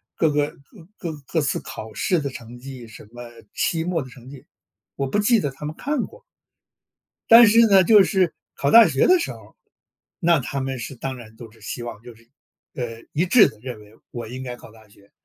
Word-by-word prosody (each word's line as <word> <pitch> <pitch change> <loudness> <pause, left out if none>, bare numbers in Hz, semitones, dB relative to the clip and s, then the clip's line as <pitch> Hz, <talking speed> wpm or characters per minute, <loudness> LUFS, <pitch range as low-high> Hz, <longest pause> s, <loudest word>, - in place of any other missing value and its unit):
各 160 -3 +2
个 145 0 -1 0.4
各 170 -5 -5 0.2
各 160 - 0
次 140 - -1
考 110 0 -9
试 180 - 0
的 140 - -3
成 120 -1 -11
绩， 125 -2 -10
什 110 -1 -14
么 120 0 -10 0.3
期 165 -1 -1
末 170 -3 -1
的 130 - -9
成 125 0 -14
绩， 140 -2 -13 0.5
我 135 - -2
不 205 - 0
记 215 +1 +3
得 145 - -2
他 150 +2 -10
们 150 - -5
看 285 -3 -2
过。 475 +2 -16 1.1
但 230 0 +9
是 230 +3 +6
呢， 195 -2 +6
就 205 +1 +6
是 185 -4 +1 0.2
考 140 - -1
大 230 +1 +8
学 135 -3 +2
的 365 0 +5
时 335 - -3
候， - - -14 0.6
那 170 -4 +3
他 135 +1 -4
们 135 -1 -4
是 125 +3 -7
当 130 +2 -5
然 110 -2 -13
都 115 -1 -12
是 115 - -22
希 120 - -6
望 120 -2 -8
就 120 -1 -11
是， 115 +1 -24 0.5
呃， 115 -2 -6
一 165 +5 +1
致 210 +4 +6
地 110 - -11
认 125 -4 -7
为 105 +1 -18 0.2
我 120 -2 -7
应 130 +3 -7
该 125 -1 -6
考 115 - -15
大 110 -1 -19
学， 100 -1 -23
135 Hz, 235 characters per minute, -22 LUFS, 120-175 Hz, 1.1 s, 但